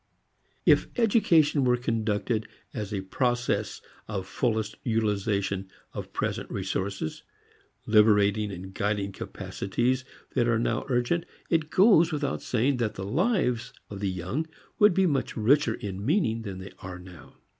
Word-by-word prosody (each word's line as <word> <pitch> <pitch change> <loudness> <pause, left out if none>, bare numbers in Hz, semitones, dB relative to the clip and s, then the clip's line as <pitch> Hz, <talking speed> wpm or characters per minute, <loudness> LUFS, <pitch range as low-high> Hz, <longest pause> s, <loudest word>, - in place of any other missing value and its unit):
If - - +5
education 170 - +4
were 125 -1 +3
conducted 110 -2 -1 0.3
as 105 -3 -4
a 100 -2 -2
process 120 0 -1 0.2
of 100 -3 -3
fullest 110 +2 -1
utilization 100 -4 0 0.2
of - - -6
present - - -2
resources, 95 -5 -3 0.6
liberating 105 -1 +4
and 95 +1 -8
guiding 100 0 -1
capacities 120 +7 -2 0.3
that 120 - +2
are 115 -1 +3
now 115 - -1
urgent, 125 +7 +1 0.2
it 160 -2 +2
goes 180 -1 +5
without 150 -2 -2
saying 125 +3 +1
that 115 -3 -1
the 95 - -5
lives 130 - 0 0.2
of 100 - -6
the 100 -1 -1
young 95 - -3 0.3
would 210 -4 +6
be 190 - +4
much 140 -7 0
richer 120 +2 +3
in 100 -1 -6
meaning 125 - +1
than 100 -4 -6
they 95 +1 -8
are 90 -1 -7
now. 90 -3 -13
110 Hz, 140 wpm, -27 LUFS, 100-135 Hz, 0.6 s, would